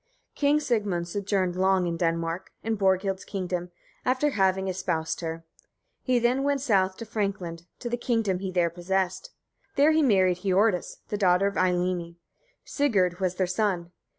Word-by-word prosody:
King 290 +1 +2
Sigmund 205 - -1
sojourned 190 -1 -1
long 190 0 +2
in 170 -1 -1
Denmark, 165 +1 -1
in 225 0 0
Borghild's 190 -1 +1
kingdom, 180 -2 -3 0.3
after 260 +4 +1
having 190 -3 +1
espoused 175 -4 -2
her. 165 0 -5 0.6
He 255 -2 +1
then 240 +3 +2
went 280 -1 +1
south 195 -7 +2
to 230 - -7
Frankland, 190 -6 -3
to 245 - -6
the 240 0 -1
kingdom 225 -6 0
he 190 -1 -4
there 175 -2 +1
possessed. 185 - -2 0.5
There 295 +1 +5
he 315 0 +3
married 190 - +3
Hiordis, 195 0 +1
the 210 - -2
daughter 185 -1 +4
of 200 - 0
Eylimi. 180 -2 0 0.5
Sigurd 195 - +1
was 185 -1 0
their 185 - +1
son. 180 -2 -1
190 Hz, 155 wpm, -27 LUFS, 180-220 Hz, 0.6 s, There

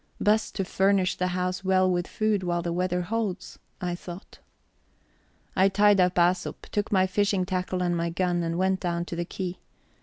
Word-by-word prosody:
Best 215 +1 +1
to 195 - -1
furnish 190 0 +2
the 180 - -1
house 180 +1 -2
well 185 0 +3
with 175 -1 0
food 215 -2 0
while 175 -1 -1
the 170 -1 -2
weather 180 0 0
holds, 195 -2 -3 0.2
I 180 -1 -2
thought. 175 +1 -9 1.2
I 190 +1 +5
tied 205 0 +4
up 180 0 +3
Æsop, 175 +1 +2 0.2
took 205 -1 -1
my 190 -2 +4
fishing 195 -1 +1
tackle 185 0 -2
and 175 -1 +1
my 170 0 -1
gun, 175 0 0
and 165 0 -2
went 190 +1 +1
down 170 -1 -2
to 175 - -6
the 170 0 -2
quay. 180 0 -5
185 Hz, 185 wpm, -26 LUFS, 175-195 Hz, 1.2 s, I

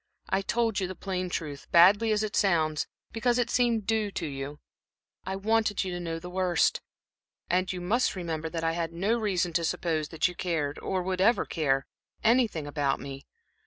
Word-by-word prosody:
I 190 - +2
told 225 +1 0
you 190 - -1
the 185 - -6
plain 185 -1 -3
truth, 150 -5 -5
badly 200 +6 +6
as 215 0 +2
it 215 - -3
sounds, 160 -6 +2 0.2
because 240 +2 +1
it 245 - 0
seemed 235 -4 +2
due 220 -1 +1
to 170 - -3
you 140 0 -5 0.7
I 190 - -2
wanted 215 +1 +1
you 185 - -4
to 175 - -4
know 165 -1 -3
the 170 +2 -8
worst. 180 -2 +1 0.7
And 185 +1 +2
you 185 - -4
must 220 +8 +1
remember 165 -3 -3
that 165 0 -4
I 165 - +2
had 165 0 -3
no 195 +7 +1
reason 185 -5 0
to 170 - +1
suppose 160 -2 -1
that 160 +1 +1
you 180 - -6
cared, 160 -5 -2
or 185 -1 -2
would 185 0 -1
ever 230 +5 +4
care, 135 -5 0 0.4
anything 225 - +3
about 145 -2 0
me. 135 0 -8
180 Hz, 195 wpm, -28 LUFS, 165-205 Hz, 0.7 s, badly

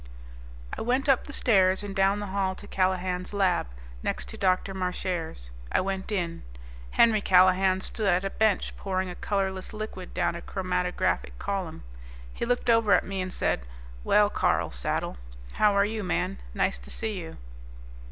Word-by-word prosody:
I - - -6
went 250 +4 +1
up 270 -3 +3
the - - -8
stairs 190 -7 +3
and 200 -1 -6
down 195 +1 +3
the 205 - -3
hall 190 -1 0
to 205 - -11
Callahan's 185 -1 -1
lab, 190 - +2 0.3
next 60 0 -3
to - - -6
Dr. 185 +1 +1
Marchare's. 180 - -3 0.2
I - - +3
went 190 +1 -3
in. 175 -5 -2 0.5
Henry 220 - +4
Callahan 185 0 +4
stood 215 +2 -2
at 180 +2 +1
a 195 - -2
bench 220 -3 +1
pouring 185 -2 -2
a - - -8
colorless 190 -2 -2
liquid 215 -4 -7
down 175 -2 +1
a 170 - -6
chromatographic 180 - -1
column. 185 - -4 0.5
He - - -3
looked 245 0 0
over 230 -3 +4
at 180 - +4
me 195 -1 -3
and 185 0 -4
said, - - -1 0.4
"Well, 210 0 +4
Carl - - +1
Saddle. - - -2 0.4
How 210 - +4
are 200 0 +4
you, 215 0 -3
man? 65 - -1 0.2
Nice 60 - +1
to 60 +1 -12
see 215 -3 -2
you." 165 -2 -8
190 Hz, 170 wpm, -27 LUFS, 180-205 Hz, 0.5 s, Henry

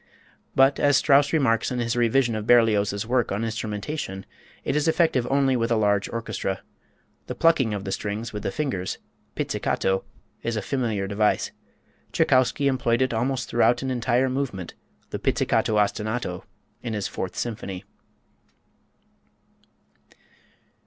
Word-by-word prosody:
But, 135 +1 +4
as 145 -2 +4
Strauss 145 0 +4
remarks 130 -8 +2
in 125 - -3
his 115 -1 -1
revision 120 +1 +2
of 110 0 -4
Berlioz's 105 -4 +3
work 125 0 +1
on 100 +3 -1
instrumentation, 105 -1 -4 0.4
it - - -1
is 150 +1 +1
effective 160 -7 +2
only 135 -1 +3
with 115 -1 0
a 120 - +3
large 100 -2 +1
orchestra. 110 -4 -3 0.7
The - - -4
plucking 135 -10 +3
of 100 - -5
the 95 - -3
strings 105 +4 -4
with 105 - -4
the - - -2
fingers 95 -9 -2 0.4
pizzicato 95 0 -1 0.4
is 115 - -2
a 105 - -2
familiar 115 -7 -1
device. 105 +2 +1 0.6
Tschaikowski 130 +2 +2
employed 125 -2 +2
it 130 - -1
almost 125 +3 -1
throughout 120 +2 +2
an 130 - -2
entire 125 +1 +1
movement, 130 -9 -3 0.4
the - - -3
"Pizzicato 110 - +1
Ostinato" 105 -2 -1 0.4
in 115 - -4
his 105 - -2
Fourth 95 - -5
Symphony. 100 -5 -5
115 Hz, 140 wpm, -25 LUFS, 105-130 Hz, 0.7 s, But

